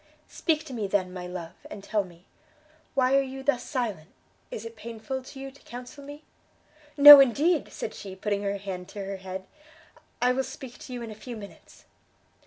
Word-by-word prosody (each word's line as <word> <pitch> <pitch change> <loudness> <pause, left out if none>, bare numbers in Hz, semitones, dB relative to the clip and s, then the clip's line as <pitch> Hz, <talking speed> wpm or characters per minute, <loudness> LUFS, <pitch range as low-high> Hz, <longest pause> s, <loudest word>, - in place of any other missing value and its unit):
"Speak 315 -2 0
to 270 - -8
me, 215 -4 -2
then, 185 -2 0
my 180 -1 -6
love, 180 -2 -7 0.2
and 200 - -9
tell 210 0 0
me; 175 -1 -16 0.7
why 260 0 +3
are 275 - +5
you 270 0 -6
thus 275 -3 +1
silent? 215 - -3 0.4
is 215 - -6
it 230 0 -8
painful 230 +4 -6
to 270 +1 -12
you 270 0 -7
to 280 - -20
counsel 250 +4 -10
me?" 290 +2 -10 0.7
"No, 290 0 +13
indeed!" 285 +5 +3
said 215 - -5
she, 195 -2 -8
putting 205 +1 -2
her 200 0 -1
hand 190 -2 -6
to 200 -2 -6
her 195 0 -4
head, 190 0 -7 0.7
"I 250 +1 +3
will 265 +1 0
speak 260 -2 -9
to 255 - -9
you 245 -1 -5
in 225 - -7
a - - -6
few 235 +2 -8
minutes." 200 -2 -13
230 Hz, 195 wpm, -27 LUFS, 195-265 Hz, 0.7 s, No